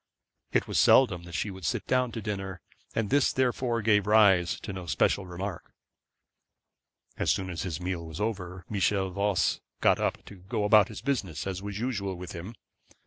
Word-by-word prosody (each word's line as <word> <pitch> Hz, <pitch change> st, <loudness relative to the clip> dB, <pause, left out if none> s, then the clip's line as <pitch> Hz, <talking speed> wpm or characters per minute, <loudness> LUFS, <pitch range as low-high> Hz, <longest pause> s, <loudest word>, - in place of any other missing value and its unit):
It -, -, +1 dB
was -, -, +1 dB
seldom 95 Hz, -10 st, +5 dB
that 85 Hz, -1 st, -8 dB
she 100 Hz, +7 st, -1 dB
would 95 Hz, -1 st, -10 dB
sit 75 Hz, -, -1 dB
down 125 Hz, -1 st, +1 dB
to 115 Hz, -, -5 dB
dinner, 95 Hz, -3 st, -4 dB, 0.4 s
and 110 Hz, -3 st, -1 dB
this 140 Hz, 0 st, +4 dB
therefore 125 Hz, -2 st, 0 dB
gave 105 Hz, -2 st, +3 dB
rise 100 Hz, -5 st, +4 dB
to 100 Hz, -, -6 dB
no 95 Hz, -2 st, -7 dB
special 95 Hz, +5 st, +1 dB
remark. 90 Hz, +1 st, -6 dB, 1.4 s
As -, -, 0 dB
soon 95 Hz, -1 st, 0 dB
as 85 Hz, -, -4 dB
his 85 Hz, -4 st, -3 dB
meal 90 Hz, -2 st, -4 dB
was 80 Hz, +2 st, -8 dB
over, 95 Hz, -5 st, -3 dB
Michel 100 Hz, -2 st, 0 dB
Voss 100 Hz, 0 st, +1 dB, 0.2 s
got -, -, +4 dB
up -, -, -2 dB
to 100 Hz, -, -12 dB
go 105 Hz, +4 st, -3 dB
out -, -, +1 dB
about 105 Hz, -1 st, +6 dB
his -, -, -8 dB
business, 115 Hz, -, -2 dB
as 95 Hz, -1 st, -3 dB
was 100 Hz, 0 st, -5 dB
usual 100 Hz, -6 st, -2 dB
with 90 Hz, 0 st, -8 dB
him. 95 Hz, +6 st, -7 dB
100 Hz, 190 wpm, -28 LUFS, 90-110 Hz, 1.4 s, about